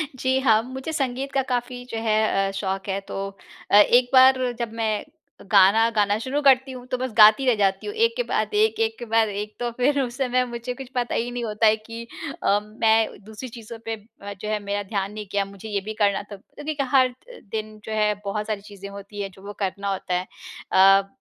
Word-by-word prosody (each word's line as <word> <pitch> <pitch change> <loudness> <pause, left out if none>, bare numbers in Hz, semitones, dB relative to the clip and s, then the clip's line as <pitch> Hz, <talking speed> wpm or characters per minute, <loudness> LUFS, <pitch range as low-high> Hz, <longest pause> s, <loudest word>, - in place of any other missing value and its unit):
जी, 260 +1 +1
हाँ। 225 -5 +4
मुझे 260 +4 -6
संगीत 270 -1 -2
का 270 - +2
काफ़ी 245 0 -2
जो 225 - -4
है 215 -3 +2
अ, - - -4
शौक़ 195 0 -3
है। 195 +1 -1
तो - - -6 0.5
अ, - - +6
एक 245 +4 +6
बार 260 0 +7 0.2
जब 235 -2 -3
मैं 220 -2 -1 0.5
गाना 205 +4 +6
गाना 205 0 +2
शुरू 265 +5 -2
करती 265 -1 +4
हूँ, 250 -1 -9
तो 255 - -2
बस 255 0 -3
गाती 215 +5 +7
रह 250 - +4
जाती 195 - +1
हूँ, 415 - -4
एक 460 +1 +3
के - - +1
बाद, 430 - -1
एक 435 +1 +3 0.2
के - - -6
बाद 225 -1 +2
एक। 210 +1 -5
तो 240 -1 -2
फ़िर 275 +4 +1
उस 245 0 -4
समय 255 -1 +1
मुझे 235 +1 -4
कुछ 265 -1 -9
पता 245 -1 -1
ही 240 +1 -1
नहीं 245 -1 -4
होता 215 0 +2
है 215 - +5
कि 230 +1 -6 0.4
अ, 205 +1 +3
मैं 220 0 +1
दूसरी 220 +4 -8
चीज़ों 230 0 -9
पे 225 0 -2 0.3
अ, 200 0 -6
जो 205 +2 -7
है 215 -1 0
मेरा 205 0 -2
ध्यान 195 0 -1
नहीं 215 -1 -6
गया, 200 -1 +1
मुझे 200 +2 -10
ये 200 -2 -1
भी 220 - -3
करना 200 0 +2
था, 205 0 -10
क्योंकि 295 +10 -7
क 265 - -2
हर 260 -1 +5
द 450 - -15
दिन 215 -1 -4
जो - - -6
है 210 -1 +2
बहुत 210 +1 -3
सारी 215 -2 -3
चीज़ें 200 -1 -10
होती 200 +1 -8
हैं, 195 - -3
जो 190 - -17
वो 205 - -6
करना 200 +1 -2
होता 185 -1 -3
है। 180 +2 -1 0.4
अ, 195 +1 +6
220 Hz, 230 wpm, -24 LUFS, 205-255 Hz, 0.5 s, बार